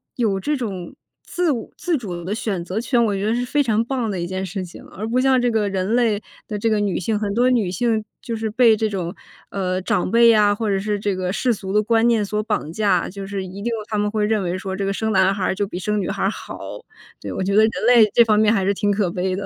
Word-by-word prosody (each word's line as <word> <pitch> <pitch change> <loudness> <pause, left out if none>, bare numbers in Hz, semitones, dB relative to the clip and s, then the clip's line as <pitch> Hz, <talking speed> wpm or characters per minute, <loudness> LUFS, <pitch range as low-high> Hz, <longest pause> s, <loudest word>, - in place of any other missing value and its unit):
有 215 -6 0
这 295 +9 -1
种 195 -8 -5 0.3
自 355 -3 0
我 235 -5 -4
自 350 -2 0
主 185 - -5
的 195 - -2
选 200 -5 -3
择 190 +5 -2
权， 240 0 +2
我 210 - 0
觉 195 - -3
得 220 +2 +1
是 245 +1 -1
非 290 +4 +1
常 225 -4 +1
棒 245 -3 -2
的 190 -3 -3
一 170 - -2
件 185 +2 -4
事 190 0 -4
情。 175 - -12
而 215 +3 -7
不 245 +3 +1
像 265 -1 +4
这 245 -1 +1
个 215 -2 +1
人 195 +3 -1
类 230 -4 +2 0.3
的 210 - -4
这 205 - -1
个 215 - +2
女 205 -3 0
性， 210 +3 -1
很 205 -2 -2
多 250 +2 +3
女 225 -7 +1
性 220 +4 0 0.2
就 235 -2 -5
是 220 0 -2
被 230 0 +5
这 220 0 -1
种， 180 -4 -4 0.4
呃， 185 -2 -1
长 180 - 0
辈 235 +3 +6
呀 210 -2 +4
或 220 +1 -3
者 195 - +1
是 205 +1 -2
这 205 -1 -1
个 185 -1 -2
世 240 +5 +1
俗 190 -3 -6
的 210 +1 +3
观 225 +1 +3
念 225 -3 +2
所 210 +1 -1
绑 210 -8 -2
架， 210 +2 +1
就 195 +1 -7
是 195 -1 -4
一 190 +2 -8
定 - - -7
有 230 -2 -2
他 215 - -2
们 205 0 +1
会 210 0 0
认 215 0 +1
为 180 0 -2
说 190 -1 -5
这 200 - -3
个 195 - 0
生 220 +2 -1
男 190 -1 +4
孩 190 -2 0
就 200 +1 -2
比 180 - -6
生 210 +3 -1
女 - - -3
孩 - - 0
好， - - -8 0.6
对， - - -6
我 - - -3
觉 195 +1 0
得 215 - +7
人 220 0 +4
类 235 -3 +6
这 235 - +8
方 215 -2 +3
面 215 0 +4
还 195 -4 +1
是 200 - +2
挺 205 +1 0
可 200 -3 0
悲 185 +1 -1
的。 200 +1 -4
210 Hz, 300 characters per minute, -21 LUFS, 195-230 Hz, 0.6 s, 这